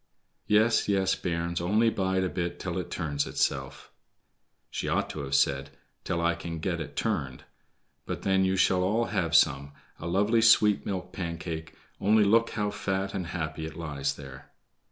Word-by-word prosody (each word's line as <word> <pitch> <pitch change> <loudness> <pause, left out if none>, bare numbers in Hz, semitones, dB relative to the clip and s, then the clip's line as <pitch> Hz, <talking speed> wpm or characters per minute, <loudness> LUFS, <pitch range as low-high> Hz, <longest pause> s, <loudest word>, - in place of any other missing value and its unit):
"Yes, 110 +2 +3
yes, 95 -1 +2
bairns, 85 -1 -2
only 110 +6 +3
bide 95 -2 0
a 95 - 0
bit 85 -1 -3
till - - -3
it - - -5
turns 75 -3 -2
itself"—she - - -5
ought - - 0
to - - -6
have 70 -1 -2
said, 70 0 +2 0.3
"till 90 -2 -1
I 85 0 +2
can 85 -1 -6
get 85 +1 -2
it 70 -2 -7
turned"—"and 65 -3 -5
then 95 0 +3
you 95 0 +2
shall 95 -1 +3
all 110 +6 +1
have 85 -2 0
some—a 70 +2 +1
lovely 105 +6 +2
sweet 105 -2 +5
milk 95 -2 -4
Pancake; 85 -2 -5 0.2
only 105 +2 +4
look 115 +3 +4
how 105 -2 -2
fat 95 0 -2
and 90 -3 -3
happy 80 -2 -4
it 80 - -10
lies 75 -4 -2
there." 70 -2 -11
90 Hz, 160 wpm, -28 LUFS, 80-100 Hz, 0.3 s, sweet